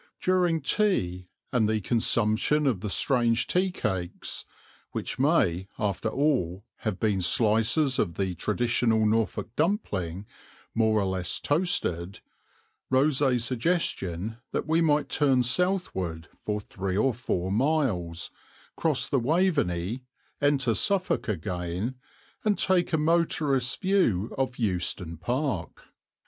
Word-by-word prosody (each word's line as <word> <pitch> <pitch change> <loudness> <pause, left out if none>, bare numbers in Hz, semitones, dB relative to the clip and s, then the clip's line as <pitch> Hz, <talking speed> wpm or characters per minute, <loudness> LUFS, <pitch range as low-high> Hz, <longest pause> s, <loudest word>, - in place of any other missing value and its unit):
During 180 -3 +2
tea 95 - 0 0.3
and 110 -4 +2
the 110 0 +1
consumption 115 +6 +2
of 125 -9 +1
the 105 +2 -4
strange 120 +1 +2
tea 185 +1 +1
cakes 95 - -3 0.5
(which - - -3
may, 105 - +2
after 105 +1 -1
all, 110 - 0
have 105 -4 -3
been 105 -4 +1
slices 115 - +2
of 85 -5 0
the 95 -2 -1
traditional 115 +3 +1
Norfolk 110 +1 0
dumpling, 100 - -1 0.5
more 110 -1 +2
or 100 - 0
less 90 -2 -1
toasted) 120 - 0 0.7
rose 135 +2 +3
a 130 -3 +3
suggestion 115 - -1 0.2
that - - -1
we 160 +2 +2
might 150 -2 +2
turn 135 -4 +2
southward 120 - -1 0.2
for 105 0 -1
three 95 -2 -4
or 130 +4 +2
four 95 -6 -2
miles, 105 - 0 0.4
cross - - +1
the 135 - +1
Waveney, 125 - 0 0.4
enter 140 -4 +2
Suffolk 190 - +1
again, 90 +3 -3 0.5
and 210 -2 +2
take 185 -2 +2
a 160 - +2
motorist's 150 -5 +1
view 180 - +1
of 130 -1 -2
Euston 90 -5 -1
Park. 120 - -3
115 Hz, 120 wpm, -27 LUFS, 95-150 Hz, 0.7 s, rose